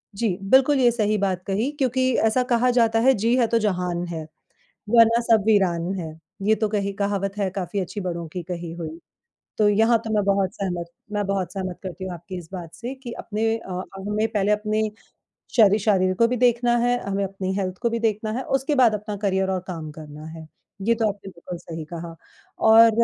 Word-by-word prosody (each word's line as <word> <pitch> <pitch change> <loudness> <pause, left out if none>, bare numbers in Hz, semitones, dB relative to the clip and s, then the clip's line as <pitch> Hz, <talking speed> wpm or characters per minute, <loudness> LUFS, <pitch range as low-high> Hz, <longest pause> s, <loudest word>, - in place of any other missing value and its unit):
जी 200 -4 0
बिल्कुल 270 +1 +5
ये 245 -2 +5
सही 215 -2 +1
बात 190 -2 -1
कही 215 +8 0
क्योंकि 260 0 +2 0.2
ऐसा 250 +3 +2
कहा 240 +1 +3
जाता 225 -2 +3
है, 265 +3 +5
जी 230 +2 +1
है 235 - +3
तो 230 0 +2
जहान 180 -4 -1
है 165 -2 -5 0.7
वरना 230 0 +6
सब 220 -2 +5
वीरान 185 -4 +2
है। 160 -4 -6 0.2
ये 215 +2 +4
तो 215 0 -1
कही 200 -1 -1
कहावत 200 0 -2
है 200 -2 +1
काफ़ी 190 +1 -3
अच्छी 190 +2 -4
बड़ों 170 -3 -4
की 180 +2 -5
कही 170 -1 -6
हुई। 165 -1 -6 0.6
तो 210 -1 +4
यहाँ 225 +3 +4
तो 220 - -4
मैं 210 -1 +2
बहुत 195 -1 +1
सहमत 175 -3 -3 0.2
मैं 205 -1 -1
बहुत 195 -2 -2
सहमत 185 -2 -4
करती 185 0 -6
हूँ 185 -1 -4
आपकी 175 +2 -8
इस 165 -2 -10
बात 170 -3 -7
से 240 +6 -5
कि 260 -2 -9
अपने 225 +1 -1
अ, 185 -4 -5 0.2
हमें 210 +3 -1
पहले 210 -2 0
अपने 215 +1 0 0.7
श 215 -4 +8 0.2
शरीर 185 -3 +3
को 230 - +6
भी 250 - 0
देखना 240 0 +3
है, 245 +1 +2
हमें 200 0 -1
अपनी 190 -1 -3
हेल्थ 185 -1 -2
को 235 - +2
भी 230 - -1
देखना 215 -1 0
है 255 - -2
उसके 270 +3 -1
बाद 245 -5 +5
अपना 210 0 -4
करियर 190 -1 0
और 185 -1 -1
काम 160 -4 -6
करना 150 0 -10
है। 160 0 -9 0.4
ये 230 - +5
तो 225 -1 +1
आपने 200 -1 -6
बिल्कुल 175 0 -8
सही 165 -2 -7
कहा 170 0 -6 0.6
और 225 +1 +8
200 Hz, 210 wpm, -23 LUFS, 180-225 Hz, 0.7 s, श